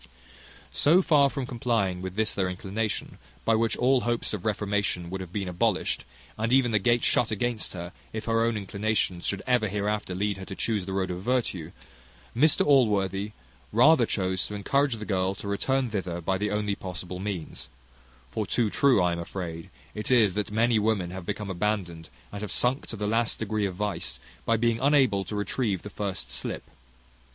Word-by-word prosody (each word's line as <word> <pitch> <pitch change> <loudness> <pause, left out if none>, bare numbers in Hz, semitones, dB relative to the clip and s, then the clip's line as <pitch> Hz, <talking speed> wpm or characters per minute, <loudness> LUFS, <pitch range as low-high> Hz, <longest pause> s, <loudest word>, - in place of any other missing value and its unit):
So 175 +6 +5
far 145 -4 +5
from 135 -1 -3
complying 115 -7 0
with 95 0 -5
this 110 0 +1
their 95 -2 0
inclination, 100 +4 -3 0.3
by 115 - +4
which 115 0 +2
all 130 +1 +3
hopes 120 -1 -1
of 100 -4 -4
reformation 105 -4 -1
would 95 0 -3
have 90 -2 -8
been 100 -1 -3
abolished, 90 -1 0 0.3
and 115 +2 0
even 130 -2 +4
the 110 - +3
gate 120 +3 +2
shut 120 - +3
against 115 +1 -1
her 85 -1 -6 0.2
if 110 0 -5
her 115 0 +2
own 115 -1 +1
inclinations 100 -3 -1
should 100 -1 -2
ever 125 -4 +2
hereafter 105 -1 -2
lead 100 +1 0
her 95 - -7
to 95 - -7
chuse 105 -4 -1
the - - -3
road 95 -1 0
of 90 0 -4
virtue, 100 -8 -1 0.6
Mr 150 +5 +4
Allworthy 105 -7 +3 0.4
rather 125 +2 +6
chose 95 -2 0
to 105 - -6
encourage 140 +6 +1
the 110 - -6
girl 95 -1 0
to 100 - -8
return 125 +5 0
thither 90 -4 -2
by 95 +2 -1
the 105 +1 0
only 105 0 0
possible 90 -1 -6
means; 95 -5 -5 0.6
for 105 -2 -2
too 115 -1 +1
true 140 -6 +4
I 90 - +3
am 85 - -2
afraid 85 0 -6 0.2
it 105 - -4
is, 115 -7 +5
that 105 +1 -1
many 115 +1 +3
women 105 -5 0
have 95 -1 -7
become 105 -1 -3
abandoned, 90 -4 -2 0.2
and 105 - -6
have 105 - -4
sunk 125 +3 +1
to - - -5
the 105 -1 -3
last 115 +2 +1
degree 110 -1 -1
of 95 - -6
vice, 90 -10 -2 0.3
by 115 - +4
being 115 0 +1
unable 130 -8 +3
to 105 - -5
retrieve 105 -1 -1
the 105 - -8
first 95 -12 -4
slip. 65 +2 -4
105 Hz, 190 wpm, -27 LUFS, 95-115 Hz, 0.6 s, rather